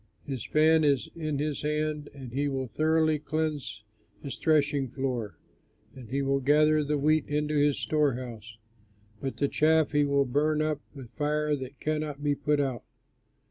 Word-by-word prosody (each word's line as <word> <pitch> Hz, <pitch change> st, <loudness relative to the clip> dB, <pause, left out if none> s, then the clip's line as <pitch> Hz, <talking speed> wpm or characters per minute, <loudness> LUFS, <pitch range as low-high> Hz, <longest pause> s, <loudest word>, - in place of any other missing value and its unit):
His 135 Hz, -5 st, -4 dB
fan 160 Hz, +1 st, +4 dB
is 140 Hz, -3 st, +2 dB
in 155 Hz, -3 st, -2 dB
his 150 Hz, 0 st, -2 dB
hand, 150 Hz, 0 st, -2 dB
and 130 Hz, -4 st, -10 dB
he 140 Hz, +2 st, 0 dB
will 135 Hz, -2 st, -2 dB
thoroughly 155 Hz, +3 st, +2 dB
cleanse 150 Hz, -8 st, -3 dB, 0.4 s
his 140 Hz, -, -5 dB
threshing 145 Hz, -3 st, +2 dB
floor, 120 Hz, -, -3 dB, 0.6 s
and 125 Hz, -4 st, -11 dB
will 135 Hz, +1 st, 0 dB
gather 150 Hz, +3 st, +4 dB
the 150 Hz, +1 st, 0 dB
wheat 155 Hz, +1 st, +2 dB
into 150 Hz, +1 st, -1 dB
his 145 Hz, -1 st, +3 dB
storehouse; 120 Hz, -7 st, -2 dB, 0.6 s
but 135 Hz, -, -4 dB
the 140 Hz, -, +1 dB
chaff 160 Hz, +2 st, +3 dB
he 145 Hz, 0 st, +3 dB
will 140 Hz, -1 st, +2 dB
burn 150 Hz, +4 st, +1 dB
up 155 Hz, -1 st, -1 dB
with 130 Hz, -5 st, -10 dB
fire 150 Hz, 0 st, 0 dB
that 130 Hz, 0 st, -8 dB
cannot 150 Hz, -2 st, -3 dB
be 145 Hz, -1 st, +2 dB
put 150 Hz, +1 st, 0 dB
out." 130 Hz, -5 st, -1 dB
145 Hz, 160 wpm, -28 LUFS, 135-155 Hz, 0.6 s, fan